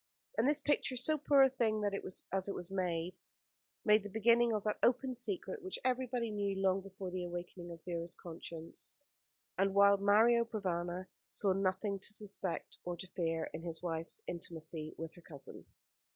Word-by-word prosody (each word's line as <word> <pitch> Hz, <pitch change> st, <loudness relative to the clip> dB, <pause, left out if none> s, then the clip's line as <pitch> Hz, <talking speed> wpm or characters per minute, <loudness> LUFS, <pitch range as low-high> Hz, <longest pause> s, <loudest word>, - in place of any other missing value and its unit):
And 230 Hz, -, +3 dB
this 295 Hz, +1 st, +4 dB
picture, 290 Hz, -2 st, +1 dB
so 260 Hz, +5 st, +2 dB
poor 280 Hz, -1 st, +6 dB
a 265 Hz, -, +6 dB
thing 220 Hz, -5 st, +1 dB
as 205 Hz, -1 st, +1 dB, 0.6 s
it -, -, -2 dB
was, 180 Hz, +1 st, -4 dB
made 180 Hz, -2 st, -1 dB, 0.7 s
the 210 Hz, -1 st, +5 dB
beginning 230 Hz, +3 st, +4 dB
of 210 Hz, -2 st, 0 dB
that 210 Hz, -1 st, -1 dB
open 255 Hz, +1 st, +3 dB
secret, 370 Hz, -, -1 dB
which 375 Hz, 0 st, -3 dB
everybody 250 Hz, -2 st, 0 dB
knew 200 Hz, -1 st, -1 dB
long 195 Hz, 0 st, +2 dB
before 190 Hz, -1 st, -7 dB
the 180 Hz, 0 st, -2 dB
awakening 175 Hz, 0 st, -6 dB
of 165 Hz, -1 st, -10 dB
Vera's 170 Hz, -1 st, -3 dB
conscience, 165 Hz, -1 st, -6 dB, 0.6 s
and 195 Hz, 0 st, +2 dB
while 200 Hz, 0 st, +7 dB
Mario 220 Hz, +4 st, +5 dB
Provana 185 Hz, -5 st, -2 dB, 0.2 s
saw 195 Hz, -2 st, +2 dB
nothing 195 Hz, +1 st, 0 dB
to 205 Hz, -, -1 dB
suspect 200 Hz, -4 st, -3 dB
or 175 Hz, 0 st, -3 dB
to 180 Hz, -, -6 dB
fear 165 Hz, -2 st, -1 dB
in 160 Hz, -, -5 dB
his 170 Hz, 0 st, -4 dB
wife's 165 Hz, -2 st, -1 dB
intimacy 160 Hz, -2 st, -5 dB
with 165 Hz, 0 st, -6 dB
her 175 Hz, -, -15 dB
cousin. 145 Hz, -5 st, -10 dB
195 Hz, 165 wpm, -35 LUFS, 175-230 Hz, 0.7 s, while